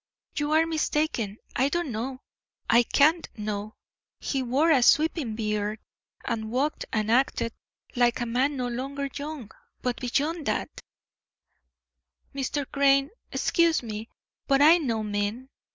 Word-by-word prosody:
"You 295 0 -1
are 320 +1 +5
mistaken. 300 -9 -1 0.2
I 265 +3 +2
don't 345 -3 -1
know; 255 +4 -4 0.5
I 235 +1 +6
can't 310 +7 +3
know. 210 0 -4 0.4
He 270 - -2
wore 270 +7 +2
a 275 -5 +5
sweeping 300 -3 +3
beard, 210 -1 -2 0.5
and 220 -1 -2
walked 270 +6 -1
and 215 0 0
acted 235 -2 +1 0.4
like 240 -1 +3
a 240 - -1
man 260 +5 0
no 250 -1 -1
longer 275 +3 -4
young, 285 -6 -6 0.3
but 250 0 -2
beyond 290 +5 -1
that - - -2 0.8
" - - -48
"Mr. 275 +1 -2
Crane, 275 0 +3 0.2
excuse 335 -5 +2
me, 220 0 -6 0.4
but 275 -1 +4
I 320 +4 +7
know 230 -8 -1
men. 210 +5 -3
260 Hz, 135 wpm, -26 LUFS, 225-295 Hz, 0.8 s, I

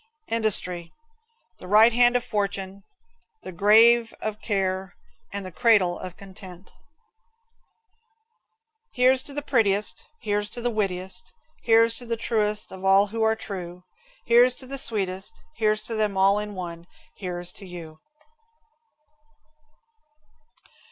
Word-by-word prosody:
Industry. 185 -6 -1 0.7
The - - -11
right 220 +4 +6
hand 245 +1 +4
of 245 - +1
fortune, 200 -1 -3 0.6
the - - -7
grave 225 +5 +5
of 215 0 -5
care, 190 -3 -2 0.4
and 200 -1 -5
the 185 - -7
cradle 195 -3 +3
of 180 -1 -8
content. 190 -1 -12 2.2
Here's 255 +1 +4
to 280 - -3
the 290 - -3
prettiest, 210 -7 +1 0.2
Here's 205 -1 -1
to - - -4
the 245 0 -1
wittiest, 190 -3 -3 0.3
Here's 230 0 +4
to 245 - -9
the 230 0 -2
truest 215 -2 -1
of 190 0 -10
all 195 +1 +5
who 225 - -2
are 220 0 +3
true. 180 -5 -8 0.4
Here's 245 +2 +5
to 260 - -7
the 275 +1 -5
sweetest 195 -5 -3
one, - - -23
Here's 215 -1 +1
to 230 - -4
them 210 -3 -1
all 195 +2 +4
in 210 -1 -6
one 170 -2 -7 0.3
here's 180 -2 -6
to 195 - -11
you. 165 -3 -10
205 Hz, 130 wpm, -25 LUFS, 185-225 Hz, 2.2 s, right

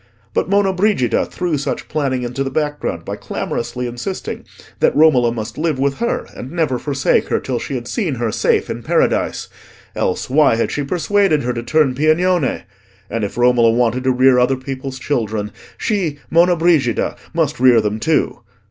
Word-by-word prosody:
But - - 0
Monna 200 -1 +2
Brigida 180 - +1
threw 175 -5 -2
such 140 - -3
planning 135 -5 -1
into 125 +3 -2
the 135 - -3
background 150 +1 -2
by - - -4
clamorously 125 +1 -4
insisting 120 +11 -5 0.3
that - - +2
Romola 135 -6 +4
must 110 +2 -6
live 155 -3 0
with 140 +1 -1
her 235 - -1
and 130 - -8
never 160 -7 0
forsake 135 -2 +1
her - - 0
till 125 -2 -3
she 140 - -5
had 120 -1 -5
seen 170 - -2
her 115 -2 -2
safe - - +1
in - - -5
Paradise—else 90 - -2
why 140 -2 +4
had 115 - -1
she 145 - -2
persuaded 175 +1 +1
her 125 +1 -1
to 120 - -4
turn 130 +3 +2
Piagnone?—and 115 - -1
if 100 - -4
Romola 120 -1 +4
wanted 120 +2 +1
to 130 - +4
rear 130 0 +4
other 130 +2 +2
people's 130 0 -6
children, 110 -6 -2 0.3
she, 185 -9 -1
Monna 175 +2 +5
Brigida, 160 -10 +1 0.2
must 155 -5 0
rear 125 -2 +6
them 105 0 -1
too. 155 0 0
130 Hz, 170 wpm, -18 LUFS, 120-155 Hz, 0.3 s, rear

